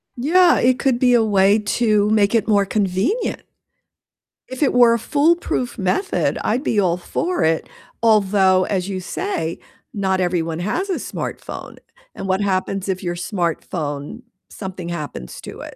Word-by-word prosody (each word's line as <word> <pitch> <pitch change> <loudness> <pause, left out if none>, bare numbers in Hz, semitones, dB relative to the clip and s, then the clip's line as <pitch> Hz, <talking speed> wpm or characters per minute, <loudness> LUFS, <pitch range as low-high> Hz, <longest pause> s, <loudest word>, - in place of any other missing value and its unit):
Yeah, 345 +8 +4
it 250 0 +2
could 260 -3 +1
be 250 -1 +4
a 235 -2 +5
way 200 0 +3
to 210 -1 +1
make 210 -1 +3
it 225 -1 +2
more 205 -2 +3
convenient. 205 - -1 1.1
If 260 +3 -3
it 275 - +2
were 240 -1 +6
a 235 - 0
foolproof 290 -1 0
method, 235 - 0
I'd 245 +5 0
be 220 - +1
all 180 -3 +2
for 350 - -2
it, 160 0 +1 0.3
although, 195 -4 +4
as 185 -2 -2
you 195 -2 -3
say, 185 - -3 0.3
not 190 -3 0
everyone 170 -2 -1
has 240 - -2
a 375 - 0
smartphone, - - -6 0.4
and 195 - -6
what 190 +1 +1
happens 195 0 -1
if 185 0 -2
your 175 -1 -2
smartphone 170 - -3 0.3
something 185 -3 -7
happens 150 - -6
to - - -9
it, - - -9
200 Hz, 155 wpm, -20 LUFS, 185-245 Hz, 1.1 s, were